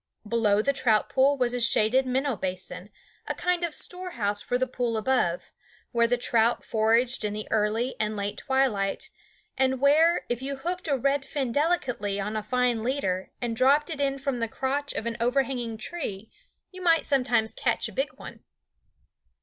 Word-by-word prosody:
Below 210 -2 +2
the 280 - +2
trout 240 -5 +2
pool 275 +2 +3
was 245 -2 +1
a 245 - -2
shaded 235 +3 +4
minnow 265 +1 0
basin, 185 0 -5 0.4
a - - -2
kind 360 -1 0
of 335 -3 -2
storehouse 235 - -3
for 245 - -1
the 260 - +1
pool 245 -3 -2
above, 215 -7 0 0.4
where 235 -1 +3
the 245 +1 +1
trout 235 -1 +1
foraged 230 +3 +2
in 210 -1 -1
the 215 0 -5
early 220 +4 +1
and 215 0 -1
late 200 0 -3
twilight, 255 -8 0 0.5
and 265 -1 +2
where, 315 +5 +4
if 240 0 -2
you 275 +1 -3
hooked 350 +7 -4
a 280 -3 +2
red 275 +2 +1
fin 270 -2 -2
delicately 250 - 0
on 210 +2 -3
a 215 - -1
fine 245 +1 +1
leader 205 -7 -1
and 235 -1 -1
dropped 280 +6 +3
it 295 -3 -3
in 275 -1 0
from 270 -2 -2
the 230 - 0
crotch 275 +5 -2
of 210 - -4
an 235 -1 -3
overhanging 245 -2 0
tree, 215 - -6 0.4
you 370 -1 -10
might 330 -2 +3
sometimes 245 -5 +1
catch - - 0
a - - -9
big - - -1
one. - - -11
245 Hz, 180 wpm, -27 LUFS, 220-275 Hz, 0.5 s, shaded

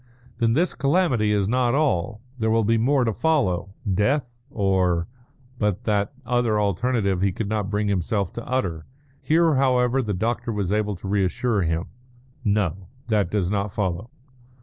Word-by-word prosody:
"Then 115 -1 +2
this 170 +8 +1
calamity 140 - +2
is 100 -2 +1
not 125 +2 +2
all. 110 - 0 0.2
There 110 0 +1
will 115 0 +3
be 115 +2 +2
more 135 +3 +3
to 115 -2 0
follow 95 - 0
death 120 +4 0
or 95 -7 +1 0.3
" 130 -1 -29
but 105 +1 0
that 105 -2 0
other 120 -3 +1
alternative 100 -1 0
he 100 0 +2
could 100 +3 -4
not 105 -2 -1
bring 105 0 0
himself 100 +1 -1
to 120 - -7
utter. 90 -12 -2 0.3
Here, 165 0 +3
however, 130 -1 +2
the 105 -5 -2
doctor 115 +4 -1
was 100 -4 -2
able 105 -1 0
to 95 - -8
reassure 100 +3 +1
him. 80 0 -1 0.6
"No. 100 -4 0 0.2
That 105 -5 +2
does 95 -3 0
not 100 -1 -1
follow." 95 +2 -2
105 Hz, 165 wpm, -24 LUFS, 95-125 Hz, 0.6 s, will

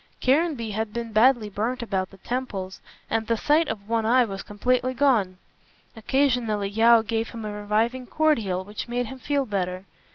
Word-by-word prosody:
Caranby 270 -4 +1
had 215 +1 -3
been 235 -1 -4
badly 230 0 +4
burnt 230 +5 -2
about 190 -4 -2
the 195 - -16
temples, 195 -5 -4 0.3
and 225 -1 -1
the 230 - +1
sight 300 +6 +2
of 210 -4 -5
one 230 0 0
eye 245 +3 +4
was 195 -3 -6
completely 250 +4 -1
gone. 230 -10 +2 0.6
Occasionally 230 -4 0
Yeo 225 +2 +5
gave 225 0 -2
him 225 -2 -7
a 210 - -4
reviving 220 +5 -1
cordial 225 -14 +1
which 205 +1 -6
made 245 +1 -1
him 265 +3 -9
feel 280 0 0
better. 185 -3 -3
225 Hz, 170 wpm, -25 LUFS, 205-255 Hz, 0.6 s, Yeo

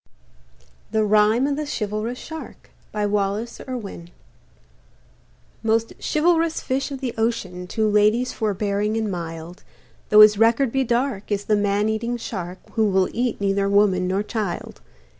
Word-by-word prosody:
HE - - -1
RHYME 215 +3 +4
OF 285 0 0
THE 305 - -2
CHIVALROUS 215 0 -3
SHARK 320 +3 -10 0.2
BY 210 -1 -1
WALLACE 205 +3 -1
IRWIN 205 -9 -6 1.5
Most 225 0 +1
chivalrous 330 +1 +2
fish 265 +2 -2
of 275 -1 -6
the 250 -3 -2
ocean, 190 -6 -2
To 220 +3 0
ladies 215 +4 +3
forbearing 210 0 -1
and 220 -2 -1
mild, 165 0 -6 0.5
Though 210 0 +8
his 210 -1 +7
record 230 +3 +3
be 270 +1 +1
dark, 240 -3 -1
is 205 0 -1
the 215 - +2
man 205 0 +1
eating 230 +2 -1
shark 185 -6 -5
Who 220 - +1
will 190 -1 +2
eat 240 0 -1
neither 200 0 +1
woman 200 -3 +3
nor 190 +2 0
child. 210 -4 -4
215 Hz, 145 wpm, -22 LUFS, 200-235 Hz, 1.5 s, Though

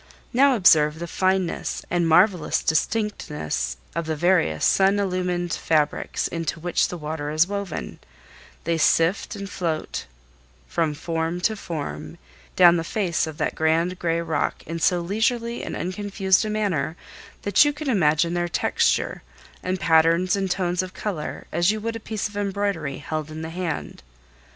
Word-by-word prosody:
Now 270 +2 +5
observe 155 -7 +5
the 170 - -5
fineness 185 +1 -1
and 175 -1 +2
marvelous 175 -1 +3
distinctness 160 - -1 0.2
of 170 0 -3
the 160 - -1
various 165 - +2
sun 195 +1 +4
illumined 180 -3 -1
fabrics 150 -2 0
into 165 -1 -3
which 175 +1 +1
the 180 - -6
water 150 -1 -4
is 155 +2 +3
woven; 200 -3 -5 0.6
they 165 0 0
sift 165 +7 +2
and 200 -1 -6
float 165 - -3 0.6
from 160 -3 0
form 165 +2 -2
to 220 +4 +1
form 80 - -6 0.4
down 175 -1 +7
the 165 - -1
face 170 -3 -1
of 155 -1 -7
that - - -1
grand 165 +3 +1
gray 165 -1 0
rock 160 -3 -2
in 165 +1 -5
so 175 +1 +2
leisurely 230 +5 -1
and - - -4
unconfused 190 +1 +1
a - - -2
manner 180 -8 -1 0.5
that 205 +4 +5
you 290 - +2
can 300 +1 -7
examine 170 - +2
their 175 0 0
texture, 170 - 0 0.4
and 185 0 -2
patterns 165 +3 +3
and 195 -1 -1
tones 180 -1 0
of 185 0 -8
color 185 -8 -4
as 175 +3 +2
you 215 +1 +1
would 230 +2 -3
a - - -4
piece 220 -2 -3
of 210 - -14
embroidery 200 -8 -2
held 155 +1 -4
in 155 +1 -7
the 160 - -5
hand. 175 - -4
175 Hz, 160 wpm, -24 LUFS, 160-195 Hz, 0.6 s, down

